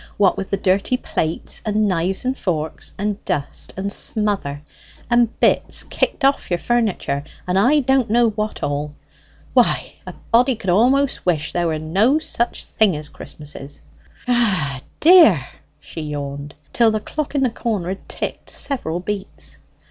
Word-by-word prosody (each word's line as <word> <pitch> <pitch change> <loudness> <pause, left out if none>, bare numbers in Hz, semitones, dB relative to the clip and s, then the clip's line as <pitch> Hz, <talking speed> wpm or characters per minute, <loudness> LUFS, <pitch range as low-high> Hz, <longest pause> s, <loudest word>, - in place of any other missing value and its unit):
What 200 -2 +4
with 195 - -5
the 200 - 0
dirty 195 +7 +1
plates, 160 -8 -2
and 215 0 +1
knives 185 +3 -1
and 260 +1 0
forks, 160 - -3
and 205 0 -2
dust 140 -1 -3
and 200 +1 -2
smother, 200 -10 -1 0.5
and 240 -1 +2
bits - - +2
kicked 280 - -1
off 275 0 +2
your 175 - +1
furniture, 205 -11 0 0.2
and 180 +1 +1
I 290 +8 +4
don't 265 -3 +2
know 235 0 +3
what 215 0 -4
all, 145 +1 -2 0.6
why - - +2
a - - -6 0.2
body 245 +2 +4
could 190 -5 -2
a'most 255 +8 +3
wish 160 -4 0
there 175 -1 +1
were 160 -1 -1
no 195 - +2
such 240 -6 -2
things 200 -8 +2
as 150 0 -4
Christmases... 145 -1 -7 0.4
Ah 195 - +1
h 130 - -13 0.2
dear!" 315 - +7 0.3
she 165 - -8
yawned, 145 -1 -5 0.2
till 235 -2 +4
the 215 0 0
clock 295 +6 -4
in 275 - +2
the 250 - +2
corner 210 -7 -2
had 190 - -6
ticked - - -4
several 180 - -2
beats. 75 - -6
195 Hz, 160 wpm, -20 LUFS, 155-240 Hz, 0.6 s, dear